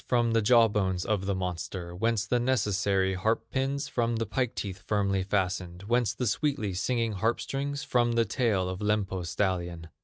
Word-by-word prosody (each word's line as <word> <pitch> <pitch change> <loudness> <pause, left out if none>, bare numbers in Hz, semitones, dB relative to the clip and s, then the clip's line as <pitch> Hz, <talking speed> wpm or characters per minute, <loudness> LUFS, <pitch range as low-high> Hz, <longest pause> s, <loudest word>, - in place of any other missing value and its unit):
From 120 -2 +2
the 115 0 +3
jaw 115 +1 +6
bones 95 -4 -1
of 100 -3 -1
the 100 - +1
monster. 90 -1 -4
Whence 115 +2 0
the 125 - +1
necessary 100 -6 +1
harp 110 +5 -1
pins? 135 +2 -1
From 115 -1 0
the 115 0 -1
pike 120 +3 -1
teeth 95 -2 -5
firmly 100 -2 +1
fastened. 90 -2 -2
Whence 120 +1 +1
the 125 - -2
sweetly 115 -3 0
singing 115 +4 0
harp 110 +4 0
strings? 140 0 -3
From 120 -1 +2
the 115 0 +3
tail 105 -4 +1
of 95 0 -4
Lempo's 100 -4 -1
stallion. 85 -3 -2
105 Hz, 180 wpm, -28 LUFS, 95-120 Hz, -, jaw